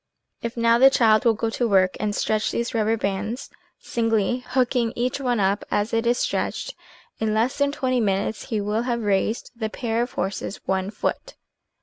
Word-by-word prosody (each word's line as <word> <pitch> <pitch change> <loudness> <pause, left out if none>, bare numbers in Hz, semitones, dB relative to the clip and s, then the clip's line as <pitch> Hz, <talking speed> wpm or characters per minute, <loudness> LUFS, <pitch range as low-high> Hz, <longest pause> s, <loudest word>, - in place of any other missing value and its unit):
If 235 0 -5
now 230 0 +4
the 265 +2 +8
child 220 -4 +4
will 230 -1 +4
go 225 +1 -2
to 240 +1 0
work 185 -2 +3
and 210 -1 -1
stretch 215 0 0
these 235 0 -2
rubber 225 0 +1
bands, 210 +4 -3 0.3
singly, 225 0 0
hooking 245 -2 +1
each 250 +3 -1
one 245 -4 0
up, 200 +1 +1
as 205 +2 0
it 230 +1 +1
is 240 +1 +3
stretched, - - -2 0.5
in 215 -1 0
less 235 +6 +1
than 285 0 +2
twenty 255 -3 0
minutes 205 0 -1
he 220 -5 -2
will 210 +2 0
have 240 -1 -2
raised 205 +3 0
the 220 -2 -3
pair 230 0 -2
of 245 - -3
horses 195 +1 -3
one 190 0 0
foot 215 - -3
225 Hz, 190 wpm, -24 LUFS, 210-240 Hz, 0.5 s, the